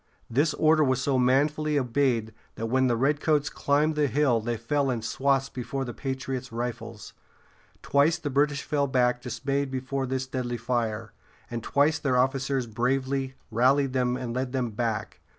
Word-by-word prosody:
] -, -, -38 dB
This 145 Hz, +6 st, +2 dB
order 155 Hz, 0 st, +4 dB
was 130 Hz, -2 st, +2 dB
so 130 Hz, 0 st, +1 dB
manfully 150 Hz, +4 st, +2 dB
obeyed 125 Hz, -4 st, +1 dB, 0.2 s
that 115 Hz, -, -4 dB
when 130 Hz, +3 st, +2 dB
the 120 Hz, -, +2 dB
redcoats 145 Hz, +3 st, +1 dB
climbed 150 Hz, +2 st, +1 dB
the 150 Hz, -1 st, +1 dB
hill 130 Hz, -4 st, +2 dB
they 120 Hz, +1 st, -2 dB
fell 135 Hz, +5 st, 0 dB
in 120 Hz, -3 st, -2 dB
swaths 135 Hz, +3 st, +1 dB
before 135 Hz, +2 st, -4 dB
the 120 Hz, -, -6 dB
patriots' 130 Hz, -1 st, -4 dB
rifles. 115 Hz, -1 st, -5 dB, 0.7 s
Twice 145 Hz, +4 st, +3 dB
the 150 Hz, -4 st, -4 dB
British 145 Hz, +1 st, +1 dB
fell 145 Hz, -2 st, 0 dB
back 125 Hz, -2 st, +2 dB
dismayed 135 Hz, +3 st, -2 dB
before 130 Hz, +1 st, -3 dB
this 130 Hz, 0 st, -2 dB
deadly 125 Hz, -2 st, -3 dB
fire, 115 Hz, -3 st, -2 dB, 0.4 s
and 120 Hz, -1 st, -3 dB
twice 145 Hz, +6 st, +2 dB
their 130 Hz, -3 st, +1 dB
officers 135 Hz, 0 st, +1 dB
bravely 130 Hz, +3 st, -1 dB, 0.2 s
rallied 130 Hz, +4 st, +3 dB
them 125 Hz, -1 st, +1 dB
and 120 Hz, -2 st, -4 dB
led 130 Hz, +1 st, -2 dB
them 125 Hz, -3 st, -1 dB
back. 110 Hz, -1 st, -3 dB
130 Hz, 170 wpm, -27 LUFS, 120-140 Hz, 0.7 s, order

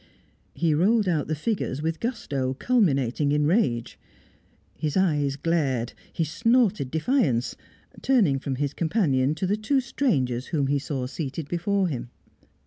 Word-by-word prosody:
He 165 Hz, -2 st, +1 dB
rolled 205 Hz, +7 st, +3 dB
out 160 Hz, -5 st, 0 dB
the 155 Hz, -, -1 dB
figures 155 Hz, -, -2 dB
with 160 Hz, 0 st, -1 dB
gusto 140 Hz, -, -2 dB
culminating 140 Hz, -, +1 dB
in 150 Hz, 0 st, +2 dB
rage. 145 Hz, -, 0 dB, 0.8 s
His 155 Hz, 0 st, -2 dB
eyes 150 Hz, -7 st, +2 dB
glared; 140 Hz, -6 st, 0 dB, 0.2 s
he 165 Hz, -, -1 dB
snorted 220 Hz, -, +2 dB
defiance, 155 Hz, -, +1 dB, 0.5 s
turning 200 Hz, -, +3 dB
from 135 Hz, 0 st, -3 dB
his 145 Hz, +1 st, -2 dB
companion 155 Hz, -, +1 dB
to 170 Hz, -, -2 dB
the 200 Hz, +3 st, +1 dB
two 240 Hz, +6 st, +1 dB
strangers 140 Hz, -, 0 dB
whom 145 Hz, -4 st, 0 dB
he 140 Hz, +1 st, +1 dB
saw 135 Hz, -2 st, -3 dB
seated 140 Hz, +2 st, -5 dB
before 190 Hz, +4 st, 0 dB
him. 125 Hz, -6 st, -4 dB
155 Hz, 140 wpm, -25 LUFS, 135-200 Hz, 0.8 s, rolled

